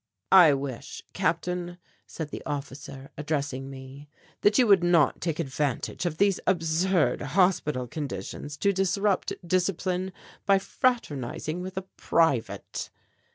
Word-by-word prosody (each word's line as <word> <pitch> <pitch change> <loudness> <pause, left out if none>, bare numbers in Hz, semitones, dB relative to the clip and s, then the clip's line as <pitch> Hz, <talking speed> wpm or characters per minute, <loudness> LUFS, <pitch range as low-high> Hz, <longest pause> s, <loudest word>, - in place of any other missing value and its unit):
"I 175 -7 +8
wish, 135 0 -6
Captain," 175 0 -1 0.3
said 160 -2 -6
the - - -6
officer 140 -1 -6
addressing 140 -3 -2
me, 135 +2 -10 0.3
"that 205 0 +4
you 255 - +6
would 200 -5 +5
not 170 -5 +3
take 165 -3 -1
advantage 145 +2 -2
of 155 -2 -3
these 200 0 +3
absurd 165 -4 +2
hospital 150 -4 +1
conditions 145 +1 -5
to 200 +6 +2
disrupt 195 +1 +1
discipline 185 +1 0 0.4
by 195 -1 +6
fraternizing 180 - -1
with 185 +1 -7
a 190 - -2
private." 140 -9 0
165 Hz, 120 wpm, -27 LUFS, 140-185 Hz, 0.4 s, I